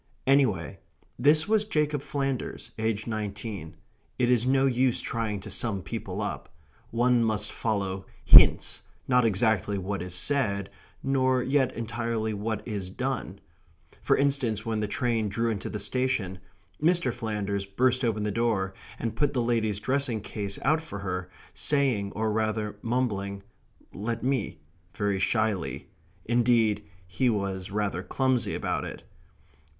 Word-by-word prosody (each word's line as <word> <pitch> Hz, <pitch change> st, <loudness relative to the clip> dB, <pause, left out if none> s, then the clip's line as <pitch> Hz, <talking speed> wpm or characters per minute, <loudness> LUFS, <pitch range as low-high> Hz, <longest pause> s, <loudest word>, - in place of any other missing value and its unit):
Anyhow, 130 Hz, -10 st, +2 dB, 0.4 s
this 150 Hz, +6 st, +5 dB
was 215 Hz, 0 st, +3 dB
Jacob 150 Hz, -8 st, 0 dB
Flanders, 135 Hz, -3 st, -3 dB
aged 110 Hz, -1 st, -1 dB
nineteen. 105 Hz, -5 st, -5 dB, 0.4 s
It 125 Hz, 0 st, +2 dB
is 125 Hz, 0 st, +3 dB
no 135 Hz, +1 st, +4 dB
use 130 Hz, -1 st, +2 dB
trying 110 Hz, -3 st, -2 dB
to 105 Hz, +1 st, -8 dB
sum 100 Hz, -3 st, -1 dB
people -, -, -4 dB
up. -, -, -4 dB, 0.4 s
One 120 Hz, +1 st, +3 dB
must 110 Hz, -1 st, 0 dB
follow 95 Hz, -3 st, -2 dB, 0.2 s
hints, -, -, +7 dB, 0.3 s
not 125 Hz, -2 st, +4 dB
exactly 105 Hz, -2 st, +2 dB
what 95 Hz, 0 st, -3 dB
is 90 Hz, 0 st, -5 dB
said, 100 Hz, -4 st, 0 dB, 0.3 s
nor 130 Hz, -2 st, +2 dB
yet 135 Hz, -1 st, +2 dB
entirely 115 Hz, -1 st, -2 dB
what 105 Hz, +2 st, -3 dB
is 100 Hz, -5 st, -3 dB
done 130 Hz, +7 st, -3 dB, 0.6 s
for -, -, +3 dB
instance, 135 Hz, -7 st, +1 dB
when 110 Hz, -1 st, -1 dB
the 105 Hz, -, -1 dB
train 115 Hz, -1 st, 0 dB
drew 115 Hz, +3 st, 0 dB
into 100 Hz, -3 st, -4 dB
the 105 Hz, -, -4 dB
station, 105 Hz, -3 st, -1 dB, 0.4 s
Mr. 170 Hz, -5 st, +3 dB
Flanders 105 Hz, -4 st, -3 dB
burst 130 Hz, +6 st, +2 dB
open 110 Hz, -3 st, 0 dB
the 105 Hz, -, 0 dB
door, 105 Hz, -4 st, 0 dB, 0.2 s
and 115 Hz, -, -3 dB
put 145 Hz, -1 st, +1 dB
the 125 Hz, -3 st, +1 dB
lady's 115 Hz, -3 st, +1 dB
dressing 130 Hz, -1 st, 0 dB
case 100 Hz, -1 st, -4 dB
out 155 Hz, +4 st, +3 dB
for 155 Hz, -11 st, -7 dB
her, 90 Hz, -2 st, -4 dB, 0.2 s
saying, 130 Hz, -9 st, +1 dB
or 110 Hz, 0 st, 0 dB
rather 110 Hz, -1 st, -1 dB
mumbling: 100 Hz, -5 st, -1 dB, 0.5 s
"Let 115 Hz, +3 st, -3 dB
me" 130 Hz, -8 st, -1 dB, 0.4 s
very 100 Hz, -2 st, 0 dB
shyly; 105 Hz, -2 st, -1 dB, 0.3 s
indeed 115 Hz, -3 st, +2 dB, 0.2 s
he 105 Hz, +8 st, +1 dB
was 100 Hz, -4 st, -2 dB
rather 100 Hz, -3 st, -1 dB
clumsy 125 Hz, -1 st, 0 dB
about -, -, -1 dB
it. -, -, -7 dB
110 Hz, 140 wpm, -27 LUFS, 100-125 Hz, 0.6 s, hints